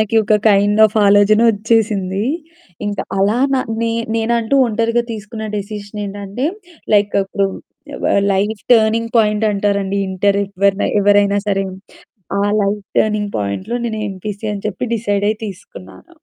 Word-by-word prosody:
మనకి 215 +1 -1
ఒక 215 - +3 0.2
kind 205 +1 +3
of 215 +1 -8
ఆలోజన 205 +2 +5
ఒచ్చేసింది. 210 -2 0 0.6
ఇంకా 205 -2 -2 0.2
అలా 205 +4 +2 0.2
నా 260 - +2 0.2
నే 230 - 0 0.3
నేనంటూ 230 +3 +1
ఒంటరిగా 230 +1 0
తీసుకున్న 220 +1 -7
డెసిషన్ 205 0 -6
ఏంటంటే, 200 +6 -4 0.5
లైక్ 205 0 +2
ఇప్పుడు 195 0 -1 0.5
అబ్బా! - - -1 0.2
లైఫ్ 205 +2 -1
టర్నింగ్ 225 +1 +2
పాయింట్ 210 0 +2
అంటారండి 200 -1 0
ఇంటరు 200 +2 +1
ఎవ్వరినై 200 +1 +1
ఎవరైనా 205 0 +4
సరే. 195 -1 +1 0.8
ఆ - - +1 0.2
లైఫ్ 200 0 -1
టర్నింగ్ 210 -1 0
పాయింట్‌లో 105 - -3
నేను 220 -2 -3
ఎంపీసీ 200 +2 -7
అని 200 0 -6
చెప్పి 205 +5 -4
డిసైడయి 205 -1 0
తీసుకున్నాను. 185 - -11
205 Hz, 135 wpm, -17 LUFS, 200-220 Hz, 0.8 s, ఆలోజన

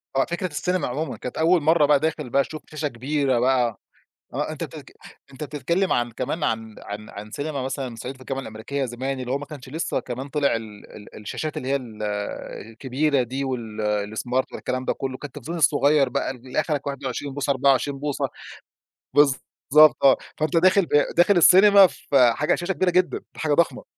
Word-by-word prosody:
آه. 135 - +3
فكرة 175 +2 -3
السينما 180 +4 -1
عمومًا. 150 +6 -3
كانت 125 - -7
أول 165 +1 +3
مرّة 155 0 +4
بقى 145 -1 +4
داخل 155 -3 -2
بقى 140 +3 +3
تشوف 155 +2 -8
شاشة 155 0 -2
كبيرة 135 0 0
بقى. 125 -3 +1 0.6
آه. - - -2
أنت - - -4
تتك - - -11 0.4
أنت 135 +3 -6
بتتكلم 170 +7 -1
عن 120 -1 0
كمان 140 +7 -3
عن 110 -1 -2
عن 105 +1 -8
عن 105 +1 -9
سينما 145 +1 -4
مثلًا 130 -2 -4
صعيدي 130 +4 -7
في - - -22
الجامعة 135 0 -3
الأمريكية 120 +5 -4
زمان، 130 +2 -4
اللي 125 0 -3
هو 140 - +1
ما 145 - -8
كانش 140 -4 -10
لسّه 160 +5 -2
كمان 130 +2 -6
طلع 140 -3 +1
ال 110 -2 -9
ال 105 - -13
الشاشات 145 +8 -5
اللي 130 - -4
هي 140 - +2
ال 115 -5 -8 0.7
الكبيرة 130 +4 0
دي 130 +3 -3
وال 110 -4 -3
الsmart 125 +2 -4 0.2
ولا - - -7
الكلام 130 0 -3
ده - - +1
كله. 130 -1 -4
كان - - -6
التلفزيون 145 +5 -7
الصغير 145 -1 +4
بقى 140 +1 -2
اللي 130 +2 -3
آخرك 150 -2 -2
21 140 0 -4
بوصة، 145 0 -2
24 140 +1 +2
بوصة 145 0 -2 0.9
بالضبط 145 +1 +4
آه. 135 -1 +7 0.2
فأنت 155 +2 0
داخل 185 +2 +4
ب - - -19 0.3
داخل 180 +3 +5
السينما، 195 +3 +8
فحاجة 135 -2 +2
على - - +6
الشاشة 175 +2 -1
كبيرة 185 0 +1
جدًا، 180 +1 +1 0.2
حاجة 155 -2 0
ضخمة. 170 +3 +1
140 Hz, 190 wpm, -24 LUFS, 125-155 Hz, 0.9 s, السينما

